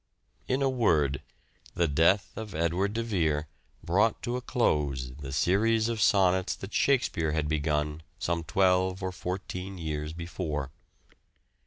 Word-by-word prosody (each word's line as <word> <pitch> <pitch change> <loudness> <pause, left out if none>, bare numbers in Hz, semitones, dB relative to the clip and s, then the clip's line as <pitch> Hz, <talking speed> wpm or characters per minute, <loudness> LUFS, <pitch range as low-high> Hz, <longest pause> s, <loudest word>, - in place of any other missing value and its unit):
In 130 +2 +1
a - - +3
word, 80 - +2 0.5
the 85 - +2
death 85 +7 +2
of 110 -3 -7
Edward 85 +5 0
de 115 +1 -1
Vere 80 -9 0 0.4
brought 105 +6 +2
to 120 - -2
a 125 - -2
close 70 - 0
the 65 +1 -8
series 110 - +2
of 115 -2 -2
sonnets 95 -2 +3
that 95 - -9
"Shakespeare" 85 - +2
had 80 -1 0
begun 75 0 -1 0.2
some 85 0 -1
twelve 95 +1 +2
or 95 - -1
fourteen 90 +1 -5
years 75 -2 -3
before. 75 -4 -4
90 Hz, 140 wpm, -28 LUFS, 75-100 Hz, 0.5 s, a